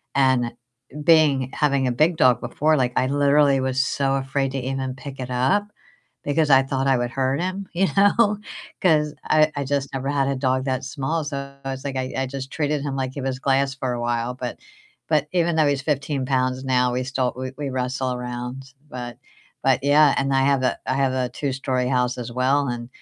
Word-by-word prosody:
And 130 Hz, -3 st, +2 dB, 0.5 s
being 150 Hz, -6 st, +4 dB
having 140 Hz, -3 st, +1 dB
a -, -, +1 dB
big 155 Hz, +7 st, +2 dB
dog 130 Hz, -7 st, +4 dB
before, 155 Hz, +1 st, +1 dB
like, 125 Hz, -2 st, 0 dB
I 130 Hz, -, +2 dB
literally 145 Hz, 0 st, +3 dB
was 130 Hz, 0 st, +1 dB
so 135 Hz, 0 st, 0 dB
afraid 135 Hz, 0 st, -1 dB
to 135 Hz, -, -2 dB
even 130 Hz, 0 st, -3 dB
pick 135 Hz, 0 st, -9 dB
it 125 Hz, -1 st, -5 dB
up 130 Hz, +11 st, +2 dB, 0.6 s
because 150 Hz, +1 st, +1 dB
I 135 Hz, 0 st, +7 dB
thought 135 Hz, 0 st, -2 dB
I 135 Hz, -, +4 dB
would 120 Hz, 0 st, -1 dB
hurt 135 Hz, +2 st, 0 dB
him, 185 Hz, +2 st, -3 dB
you 190 Hz, +2 st, +2 dB
know? 205 Hz, +1 st, +4 dB, 0.4 s
'Cause 150 Hz, -4 st, +3 dB
I 155 Hz, 0 st, +4 dB
I 145 Hz, -, -2 dB
just 140 Hz, 0 st, -1 dB
never 135 Hz, 0 st, -3 dB
had 140 Hz, -2 st, +1 dB
a 140 Hz, -, 0 dB
dog 130 Hz, 0 st, 0 dB
that 130 Hz, 0 st, -1 dB
small, 150 Hz, +4 st, -2 dB
so 140 Hz, -2 st, -5 dB
I 135 Hz, -, -2 dB
was 135 Hz, 0 st, -6 dB
like 135 Hz, -1 st, -3 dB
I 130 Hz, 0 st, -3 dB
I 135 Hz, 0 st, -1 dB
just 135 Hz, 0 st, -6 dB
treated 150 Hz, -1 st, -1 dB
him 140 Hz, -2 st, -3 dB
like 130 Hz, -1 st, -3 dB
he 140 Hz, -, -5 dB
was 130 Hz, -1 st, -3 dB
glass 135 Hz, 0 st, +1 dB
for 130 Hz, -2 st, -2 dB
a 120 Hz, -, -4 dB
while. 120 Hz, +1 st, -1 dB
But 125 Hz, -1 st, -6 dB, 0.5 s
but 150 Hz, -2 st, +2 dB
even 170 Hz, -2 st, +2 dB
though 155 Hz, -, +4 dB
he's 140 Hz, -2 st, 0 dB
15 140 Hz, -1 st, -1 dB
pounds 130 Hz, -1 st, 0 dB
now, 125 Hz, -1 st, +2 dB
we 125 Hz, +1 st, -1 dB
still 130 Hz, -1 st, -1 dB
we 130 Hz, 0 st, -4 dB
we 145 Hz, -2 st, -3 dB
wrestle 130 Hz, 0 st, -2 dB
around. 125 Hz, +2 st, -6 dB, 0.2 s
But 125 Hz, -2 st, -7 dB, 0.5 s
but, 130 Hz, -2 st, +3 dB
yeah, 145 Hz, 0 st, +5 dB
and 135 Hz, 0 st, 0 dB
I 135 Hz, -, +3 dB
have 140 Hz, -1 st, +2 dB
a 125 Hz, -, +1 dB
I -, -, +1 dB
have 135 Hz, -1 st, +1 dB
a 130 Hz, -1 st, -1 dB
two-story 130 Hz, -1 st, -2 dB
house 125 Hz, -1 st, +1 dB
as 120 Hz, -1 st, -6 dB
well, 135 Hz, +3 st, +1 dB
and 120 Hz, -1 st, -4 dB
135 Hz, 215 wpm, -23 LUFS, 130-145 Hz, 0.6 s, I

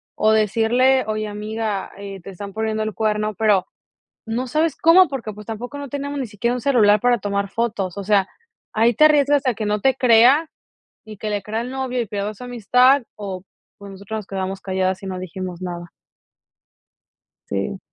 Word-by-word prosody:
o 215 Hz, 0 st, +3 dB
decirle: 230 Hz, +5 st, +3 dB
"Oye, 215 Hz, 0 st, -2 dB
amiga, 210 Hz, -1 st, -4 dB
eh, 200 Hz, -1 st, -8 dB
te 195 Hz, -, -9 dB
están 200 Hz, +1 st, -8 dB
poniendo 220 Hz, 0 st, -2 dB
el 215 Hz, -1 st, -3 dB
cuerno". 215 Hz, -1 st, -1 dB
Pero 210 Hz, -3 st, +2 dB, 0.6 s
no 235 Hz, +3 st, -2 dB
sabes 310 Hz, +5 st, 0 dB
cómo 350 Hz, +2 st, +6 dB
porque 255 Hz, -6 st, -5 dB
pues 210 Hz, 0 st, -12 dB
tampoco 245 Hz, +6 st, -6 dB
no 285 Hz, -, -6 dB
teníamos 285 Hz, +1 st, -4 dB
ni 260 Hz, -, -2 dB
siquiera 235 Hz, +3 st, -2 dB
un 250 Hz, -, -3 dB
celular 215 Hz, -7 st, +4 dB
para 245 Hz, 0 st, +3 dB
tomar 200 Hz, 0 st, -2 dB
fotos. 205 Hz, -4 st, -2 dB
O 200 Hz, -, -3 dB
sea, 195 Hz, -1 st, +2 dB, 0.4 s
ahí 230 Hz, +2 st, +3 dB
te 305 Hz, -, +5 dB
arriesgas 290 Hz, -2 st, +3 dB
a 250 Hz, -, +2 dB
que 215 Hz, -, -4 dB
no 210 Hz, 0 st, 0 dB
te 265 Hz, +4 st, +3 dB
crea 255 Hz, +6 st, +5 dB, 0.6 s
y 215 Hz, -1 st, -10 dB
que 215 Hz, -, -4 dB
le 205 Hz, -1 st, -2 dB
crea 220 Hz, +2 st, -3 dB
al 245 Hz, -, -5 dB
novio 260 Hz, -2 st, -2 dB
y 230 Hz, -, -4 dB
pierdo 205 Hz, +1 st, -3 dB
esa 230 Hz, +4 st, -10 dB
amistad 250 Hz, +3 st, +3 dB
o 195 Hz, -3 st, -6 dB, 0.3 s
pues 200 Hz, -1 st, -11 dB
nosotros 200 Hz, +3 st, -6 dB
nos 205 Hz, -, -11 dB
quedamos 190 Hz, 0 st, -4 dB
calladas 190 Hz, 0 st, -1 dB
y 195 Hz, -, -5 dB
no 185 Hz, -1 st, -4 dB
dijimos 185 Hz, 0 st, -6 dB
nada. 175 Hz, -1 st, -6 dB, 1.6 s
Sí. 100 Hz, -, -2 dB
215 Hz, 190 wpm, -21 LUFS, 200-245 Hz, 1.6 s, cómo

